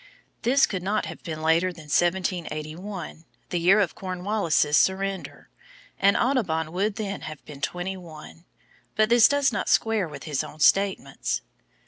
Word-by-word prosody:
This 265 +4 +4
could 185 -3 -4
not 205 +4 -1
have - - -8
been 155 -2 -6
later 165 +3 +3
than 165 -2 -12
1781, 175 +1 -2 0.3
the 175 - -1
year 185 +5 +5
of 185 -7 +1
Cornwallis' 185 -5 0
surrender, 190 +2 0 0.5
and 200 +1 +4
Audubon 175 - 0
would 200 +4 -1
then 205 -3 -4
have 155 -2 -9
been 145 -2 -11
twenty 180 +5 -3
one, 165 -1 -12 0.5
but 215 0 +3
this 235 -1 +7
does 285 -1 +2
not - - -2
square 220 -5 +2
with 145 -2 -9
his 150 -4 -2
own 155 - -11
statements. 190 -6 +1
185 Hz, 150 wpm, -25 LUFS, 160-200 Hz, 0.5 s, this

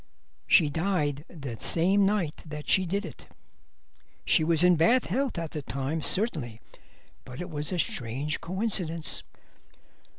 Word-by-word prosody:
She 155 -5 +5
died 155 -4 -1
the 140 -9 -7
same 195 +4 +3
night 190 -7 0
that 150 -1 -7
she 185 -1 +4
did 200 +3 -1
it. 160 - -11 1.0
She - - +3
was 165 +1 +2
in 180 0 +6
bad 230 +11 +4
health 260 +3 -1
at 165 -2 -4
the 155 - -4
time, 140 +3 -3
certainly, 150 - 0 0.6
but 125 - -10
it 180 0 -6
was 150 +1 -4
a 180 - -1
strange 140 0 -2
coincidence." 170 -5 -2
165 Hz, 140 wpm, -28 LUFS, 150-190 Hz, 1.0 s, in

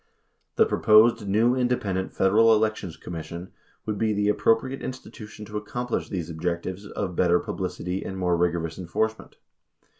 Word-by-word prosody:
The - - +5
proposed 110 0 +4
new 110 +5 +3
independent 120 -7 -1
Federal 110 +4 +4
Elections 105 -6 -1
Commission 85 +2 -7 0.3
would 105 -2 -3
be 110 -1 +1
the 105 0 +1
appro 115 +2 +3
priate 130 +3 -6
institution 110 -4 -8
to 105 0 -5
accomplish 120 +3 -3
these 90 -5 -3
objectives 85 +4 -4
of 95 -4 -4
better 90 0 +3
publicity 90 0 -4
and 95 - -6
more 90 -2 +1
rigorous 85 -1 -1
enforcement. 110 +5 -2
100 Hz, 145 wpm, -25 LUFS, 90-110 Hz, 0.3 s, The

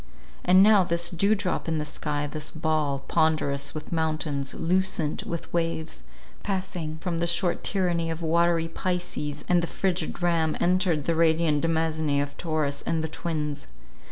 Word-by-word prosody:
And 185 +2 +6
now, 210 -2 +6
this 170 0 -1
dew 200 +5 +3
drop 185 -4 -2
in 160 -1 0
the 150 - -2
sky, 150 -1 -3
this 150 +1 -4
ball, 155 -3 -1
ponderous 145 -3 +1
with 155 0 -7
mountains, 155 -4 -1
lucent 175 -3 0
with 170 -1 -5
waves, 165 - -2 0.4
passing 185 -5 -3
from 165 0 -3
the 170 - +1
short 170 +1 +1
tyranny 175 -4 0
of 165 +1 -4
watery 165 0 +2
Pisces 165 -4 -3
and 175 -1 +4
the 170 - -2
frigid 185 0 -2
Ram, 165 -3 +2
entered 180 -4 +2
the 165 - +1
radiant 160 -2 +3
demesne 160 -3 +1
of 145 0 -2
Taurus 155 -4 -1
and 160 -1 -1
the - - -1
Twins. 150 -2 -3
165 Hz, 155 wpm, -26 LUFS, 155-175 Hz, 0.4 s, And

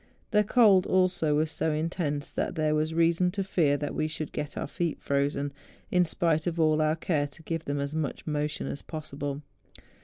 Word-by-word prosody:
The 210 -2 +4
cold 210 -4 +5
also 185 -5 +2
was 155 +1 +1
so 160 - 0
intense, 155 -2 -2
that - - -2
there 155 -1 +1
was 155 +1 +1
reason 170 +2 +3
to 195 -1 -1
fear 160 -7 +2
that 145 0 -3
we 155 - 0
should 155 -1 -5
get 145 -1 -5
our - - -2
feet 170 +1 -2
frozen, 140 0 -1 0.4
in 180 -1 +4
spite 165 0 0
of 170 -1 -2
all 155 -1 +3
our 155 0 +2
care 155 -3 0
to 160 +3 -15
give 165 0 -3
them 145 0 -2
as 140 +1 -3
much 155 -3 -3
motion 150 0 -2
as 140 - -5
possible. 145 -2 -5
155 Hz, 195 wpm, -28 LUFS, 145-170 Hz, 0.4 s, cold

